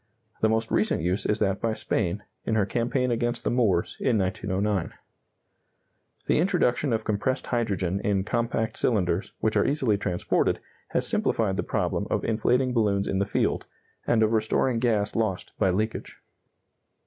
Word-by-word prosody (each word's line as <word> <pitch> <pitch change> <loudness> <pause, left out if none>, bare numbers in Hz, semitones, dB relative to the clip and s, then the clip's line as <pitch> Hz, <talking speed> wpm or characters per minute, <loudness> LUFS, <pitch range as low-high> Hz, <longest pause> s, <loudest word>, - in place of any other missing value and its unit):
The 110 - +4
most 110 0 0
recent 105 -6 +1
use 90 +3 0
is 105 - +1
that 100 -2 0
by 115 -1 0
Spain, 105 -1 -1 0.2
in 110 - -1
her 105 -3 +3
campaign 125 +3 0
against 120 0 -1
the - - 0
Moors, 110 -8 +1
in 120 -4 +2
1909. 95 -1 -1 1.3
The - - +2
introduction 155 -7 +1
of 110 -1 0
compressed 120 +6 -1
hydrogen 100 -6 -1
in 100 -2 0
compact 110 +1 -1
cylinders, 95 -5 0
which 110 - +1
are - - +4
easily 130 -8 +1
transported, 90 -4 0 0.3
has - - 0
simplified 105 -4 +1
the 105 - 0
problem - - -1
of - - 0
inflating 125 +3 +1
balloons 100 -4 +1
in 95 - 0
the 100 - 0
field, - - 0 0.4
and 115 -2 +3
of 110 - +2
restoring 115 +2 +1
gas 110 -4 +1
lost 110 -5 -1
by 95 - +3
leakage. 110 +4 -2
110 Hz, 160 wpm, -26 LUFS, 100-115 Hz, 1.3 s, The